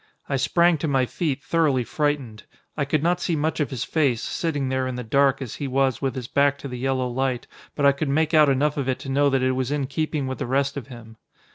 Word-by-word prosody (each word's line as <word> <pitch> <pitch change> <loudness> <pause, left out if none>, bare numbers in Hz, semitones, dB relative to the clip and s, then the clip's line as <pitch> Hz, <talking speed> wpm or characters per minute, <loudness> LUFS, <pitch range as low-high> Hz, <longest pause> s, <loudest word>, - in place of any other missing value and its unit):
I 140 - -1
sprang 170 +4 +3
to 160 - -1
my 135 -3 +2
feet 145 0 -3
thoroughly 150 -7 +2
frightened. 145 -8 -2 0.3
I 145 - -1
could 150 +1 0
not 175 +1 +1
see 170 - 0
much 155 +2 -1
of 150 - 0
his 130 -5 -3
face, 140 -8 +1
sitting 145 -5 -2
there 130 0 0
in 130 - -4
the 125 - -4
dark 140 +3 +2
as 120 - -7
he 145 - -3
was 135 -1 +1
with 135 -3 -1
his 125 -3 -5
back 140 +1 +2
to 140 - -7
the 125 -2 -6
yellow 130 0 0
light, 130 0 -2 0.3
but 145 - +1
I 140 - +7
could 140 +1 -3
make 155 +3 +1
out 155 -2 +6
enough 145 +2 +1
of 135 -2 -1
it 130 - 0
to 135 - -7
know 140 +1 +3
that 135 -1 +1
it 130 - +2
was 130 -1 -1
in 145 -1 -1
keeping 150 +1 -2
with 130 0 -4
the - - -3
rest 140 +2 0
of 135 -5 -6
him. 115 -3 -12
135 Hz, 260 wpm, -24 LUFS, 130-150 Hz, 0.3 s, I